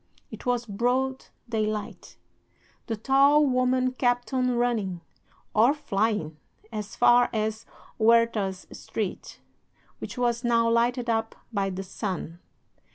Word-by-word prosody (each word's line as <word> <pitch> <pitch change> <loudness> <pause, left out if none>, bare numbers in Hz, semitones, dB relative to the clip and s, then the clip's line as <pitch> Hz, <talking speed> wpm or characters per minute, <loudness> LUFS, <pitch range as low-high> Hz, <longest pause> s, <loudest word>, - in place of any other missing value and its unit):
It - - -9
was 245 -1 +1
broad 250 +5 -1 0.2
daylight. 215 -2 -3 0.7
The 225 - -1
tall 275 +5 +4
woman 255 -1 +2
kept 245 -1 0
on 255 -1 +2
running, 215 -8 -1 0.5
or 235 +7 +4
flying, 205 - -1 0.3
as 210 -2 -6
far 245 0 +5
as 220 0 -2 0.3
Huertas 220 -4 +2
Street, - - -5 0.6
which - - -7
was 240 -1 0
now 230 -1 +3
lighted 240 +1 +1
up 225 -1 -1 0.2
by 200 -2 0
the 190 +1 -5
sun. 185 -3 -5
230 Hz, 115 wpm, -26 LUFS, 210-250 Hz, 0.7 s, far